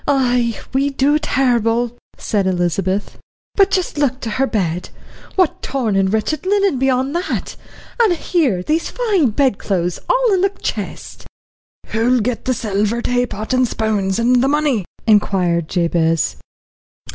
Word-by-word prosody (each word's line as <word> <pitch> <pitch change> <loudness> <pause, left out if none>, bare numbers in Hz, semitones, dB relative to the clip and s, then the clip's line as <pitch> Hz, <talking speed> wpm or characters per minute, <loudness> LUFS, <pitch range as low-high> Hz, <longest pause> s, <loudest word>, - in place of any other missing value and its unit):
"Ay, 250 -4 +1
we 275 +2 +2
do, 280 +2 +2
terrible," 240 -4 +1 0.2
said 200 -3 -1
Elizabeth. 185 +2 -1 0.3
"But 395 -1 +4
just 370 -6 -1
look 270 -3 +1
to 225 - -4
her 270 +4 +1
bed, 180 -6 -2 0.5
what 370 -5 +1
torn 245 -7 -1
and 190 -1 +2
wretched 220 +8 -1
linen 395 -6 +1
be 265 +1 +2
on 260 +2 0
that 350 +3 -3 0.5
and 435 -6 +4
here 295 - 0
these 315 - 0
fine 405 - +1
bedclothes 195 -8 0
all - - +3
in 370 - +2
the 390 - +3
chest." 395 - -6 0.6
"Who'll 240 +3 +2
get 235 +2 -2
the 255 - +1
silver 215 +1 -1
taypot 245 -2 -1
and 255 -1 +3
spoons, 210 -4 -1
and 245 +1 +3
the 265 - +2
money?" 285 - +1 0.2
inquired 180 -6 +2
Jabez. 165 -2 +1
245 Hz, 145 wpm, -18 LUFS, 205-285 Hz, 0.6 s, But